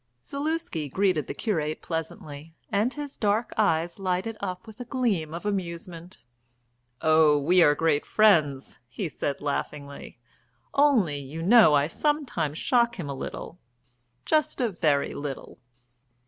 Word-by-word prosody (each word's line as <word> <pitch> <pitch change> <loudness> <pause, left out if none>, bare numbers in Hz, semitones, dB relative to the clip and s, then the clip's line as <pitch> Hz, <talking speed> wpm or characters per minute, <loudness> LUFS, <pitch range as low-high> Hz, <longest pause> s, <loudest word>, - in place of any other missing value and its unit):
Zaluski 280 - -3
greeted 185 -1 +1
the - - -5
curate 155 -9 -2
pleasantly, 160 -1 -6 0.2
and 215 +4 +1
his 290 -1 -7
dark 215 +2 0
eyes 170 -4 +1
lighted 190 +3 -1
up 185 -1 -5
with 220 +1 -13
a - - -4
gleam 225 - -1
of 170 +4 -7
amusement. 175 - -5 0.8
"Oh, 155 -1 +5
we 175 +6 +3
are 150 -3 +5
great 155 -2 +1
friends," 155 -11 +2
he 175 - -4
said 145 -2 -4
laughingly. 145 0 -5 0.6
"Only, 235 - +3
you 145 +4 -7
know, 220 -4 +7
I 140 0 +3
sometimes 175 - -1
shock 235 +2 +2
him 150 -5 -4
a - - -3
little 165 +5 -7 0.7
just 305 -2 +1
a 245 -3 +1
very 155 -7 0
little." 140 -2 -7
175 Hz, 135 wpm, -26 LUFS, 150-220 Hz, 0.8 s, know